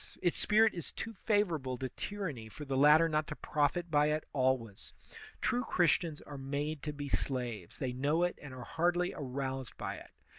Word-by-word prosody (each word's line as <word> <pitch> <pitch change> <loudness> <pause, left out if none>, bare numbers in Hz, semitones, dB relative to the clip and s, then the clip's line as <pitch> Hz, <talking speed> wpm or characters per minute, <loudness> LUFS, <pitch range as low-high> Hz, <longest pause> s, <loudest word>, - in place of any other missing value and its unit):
Its 175 - +2
spirit 220 +1 +5
is 170 - -5
too 225 - -5
favorable 175 - 0
to 130 - -2
tyranny 160 - -5
for 150 +7 -8
the 135 -1 -2
latter 150 +4 +7
not 155 -1 0
to 150 - -5
profit 155 +4 0
by 150 0 +4
it 150 0 0
always. 130 -6 0 0.5
True 250 0 +1
Christians 170 -5 +2
are 145 -2 -8
made 145 +2 -2
to 150 - -3
be 145 -1 -5
slaves; 125 -9 -2
they 130 -2 -2
know 145 +6 +1
it 175 - 0
and 145 - -8
are 130 -1 -7
hardly 175 +2 +1
aroused 130 -3 -4
by - - -4
it. - - -12
150 Hz, 185 wpm, -33 LUFS, 130-170 Hz, 0.5 s, latter